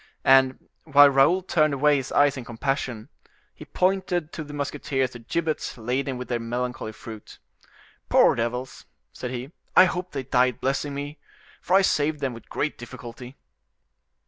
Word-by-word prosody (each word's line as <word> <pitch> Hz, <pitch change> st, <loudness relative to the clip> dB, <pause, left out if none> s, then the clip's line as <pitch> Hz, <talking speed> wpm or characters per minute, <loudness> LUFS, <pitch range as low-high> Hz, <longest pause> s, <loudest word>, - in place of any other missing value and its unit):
And, 130 Hz, -1 st, +4 dB, 0.2 s
while 145 Hz, -2 st, +7 dB
Raoul 140 Hz, +8 st, +4 dB
turned 155 Hz, -5 st, +2 dB
away 145 Hz, +1 st, +3 dB
his 135 Hz, -1 st, -5 dB
eyes 145 Hz, -1 st, +4 dB
in 130 Hz, -, -6 dB
compassion, 120 Hz, -1 st, -3 dB, 0.4 s
he -, -, -12 dB
pointed 180 Hz, -3 st, 0 dB
to 160 Hz, -, -5 dB
the 145 Hz, -, -11 dB
musketeers 140 Hz, -2 st, -2 dB
the 120 Hz, -, -10 dB
gibbets 155 Hz, +6 st, -3 dB
laden 125 Hz, +3 st, -2 dB
with 125 Hz, -, -6 dB
their 120 Hz, -1 st, -1 dB
melancholy 120 Hz, -1 st, -4 dB
fruit. 110 Hz, -1 st, -11 dB, 0.7 s
"Poor -, -, +5 dB
devils!" 120 Hz, +2 st, -4 dB, 0.3 s
said 125 Hz, -, -5 dB
he, 125 Hz, +3 st, -6 dB, 0.2 s
"I 185 Hz, -, +9 dB
hope 180 Hz, 0 st, -3 dB
they 135 Hz, -2 st, -4 dB
died 125 Hz, -1 st, +1 dB
blessing 140 Hz, +1 st, -1 dB
me, 145 Hz, +1 st, -6 dB, 0.4 s
for 180 Hz, -, +1 dB
I 195 Hz, -, +6 dB
saved 150 Hz, -3 st, +1 dB
them 135 Hz, -3 st, -2 dB
with 115 Hz, -, -13 dB
great 150 Hz, -, -2 dB
difficulty." 120 Hz, +2 st, -10 dB
135 Hz, 160 wpm, -25 LUFS, 125-150 Hz, 0.7 s, I